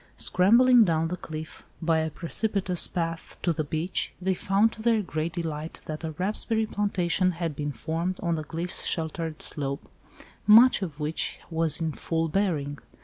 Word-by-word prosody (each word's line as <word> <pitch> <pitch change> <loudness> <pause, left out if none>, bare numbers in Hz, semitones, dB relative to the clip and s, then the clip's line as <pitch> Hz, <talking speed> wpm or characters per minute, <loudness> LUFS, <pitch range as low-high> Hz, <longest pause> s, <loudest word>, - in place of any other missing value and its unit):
Scrambling 235 +6 +5
down 165 -3 +1
the 180 - -2
cliff 155 -2 -8 0.2
by 165 -1 +2
a 160 0 -1
precipitous 185 +2 +1
path 165 -2 -4
to 170 - +2
the 155 0 -2
beach, 160 +5 -2
they 190 +1 0
found 200 +4 +2
to 220 - -10
their 225 -2 +2
great 160 -1 -3
delight 160 -2 -5
that 155 +1 -6
a 160 - -2
raspberry 215 +6 +1
plantation 185 -4 0
had 165 -3 -3
been 145 0 -3
formed 165 +8 -3
on 170 -1 -1
the 155 -1 -2
cliff 170 +4 -5
sheltered 160 -1 -1
slope, 140 -2 -4 0.6
much 230 +3 +7
of 160 -6 -5
which 150 +2 -2
was 165 0 +2
in 160 -1 -1
full 165 +2 -2
bearing. 150 -7 -1
165 Hz, 165 wpm, -26 LUFS, 155-190 Hz, 0.6 s, much